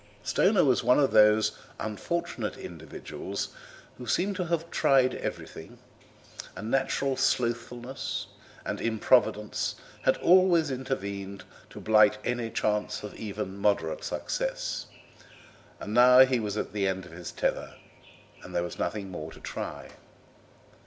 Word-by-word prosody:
Stoner 195 - +3
was 130 -3 +3
one 125 +3 +4
of 140 - +3
those 105 0 +5 0.3
unfortunate 120 - -3
individuals 80 -3 -6 0.5
who 125 - -8
seem 195 +3 +1
to 185 -2 -2
have 170 0 -2
tried 130 -2 +3
everything; - - -6 0.8
a 100 - -7
natural 135 +3 0
slothfulness 120 -1 -1 0.4
and - - -3
improvidence 105 -2 +1 0.3
had 130 - +3
always 175 -4 +4
intervened 100 -7 -4 0.3
to - - -10
blight 105 -1 +5
any 120 -2 -1
chance 105 -1 -1
of 105 - -7
even 105 -2 -5
moderate 100 -6 0
success, - - -3 0.9
and 105 - -6
now 125 +2 +8
he 130 -2 +1
was 105 -1 -3
at 105 - -3
the 100 -2 0
end 95 -1 -2
of 90 - -13
his 85 +1 -8
tether, - - -2 0.7
and - - -9
there 85 - +1
was 85 - -6
nothing 100 -3 -3
more 80 -2 -6
to - - -13
try. - - -6
115 Hz, 130 wpm, -28 LUFS, 105-135 Hz, 0.9 s, now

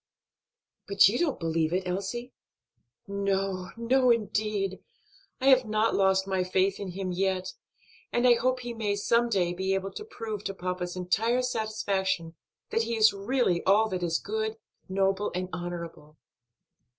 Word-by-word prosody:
"But 200 -1 +6
you 215 +5 0
don't 330 -5 0
believe 165 -1 0
it, 185 +1 -1
Elsie?" 240 +7 -4 0.7
"No, 195 -2 -1
no, 250 +2 +3
indeed! 210 -3 0 0.6
I 260 - -3
have 260 -2 +6
not 215 +1 +1
lost 190 -1 +3
my 190 -1 0
faith 190 +2 +1
in 190 -3 -5
him 190 0 -3
yet, 185 0 -1 0.6
and 240 +1 +3
I 245 - +8
hope 255 +2 0
he 240 -1 -5
may 210 -3 -1
some 235 +3 +2
day 180 -5 +1
be 190 +2 0
able 195 0 -3
to - - -7
prove 220 - -6
to 195 - -3
papa's 180 -1 -4
entire 220 +7 +1
satisfaction 205 -8 -1 0.4
that 225 - +2
he 230 +1 -1
is 220 -1 +6
really 200 -3 0
all 215 +3 +4
that 185 -2 -3
is 165 -2 +1
good, 220 +1 -3 0.3
noble, 195 +1 +1
and 185 0 -2
honorable." 170 -3 -6
195 Hz, 155 wpm, -28 LUFS, 185-225 Hz, 0.7 s, I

